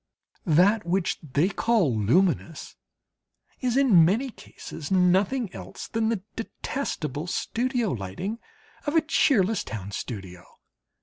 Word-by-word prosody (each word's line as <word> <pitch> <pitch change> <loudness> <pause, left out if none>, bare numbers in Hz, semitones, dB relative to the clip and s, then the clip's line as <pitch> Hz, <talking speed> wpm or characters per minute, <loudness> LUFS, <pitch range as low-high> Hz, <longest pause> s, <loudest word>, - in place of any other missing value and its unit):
That 185 +7 +4
which 175 +1 0
they 150 +3 +1
call 195 - +1
"luminous" 165 - +1 0.8
is, 250 -1 0
in 235 -12 +6
many 225 +10 +1
cases, 160 -8 -9
nothing 190 +4 +2
else 95 +1 -8
than 225 -1 0
the 220 -5 -2
detestable 175 - -4
studio 240 +3 -1
lighting 125 - -4 0.5
of 295 - 0
a 325 - +6
cheerless 225 - +2
town 100 -3 -6
studio. 95 -6 -6
185 Hz, 115 wpm, -26 LUFS, 150-230 Hz, 0.8 s, in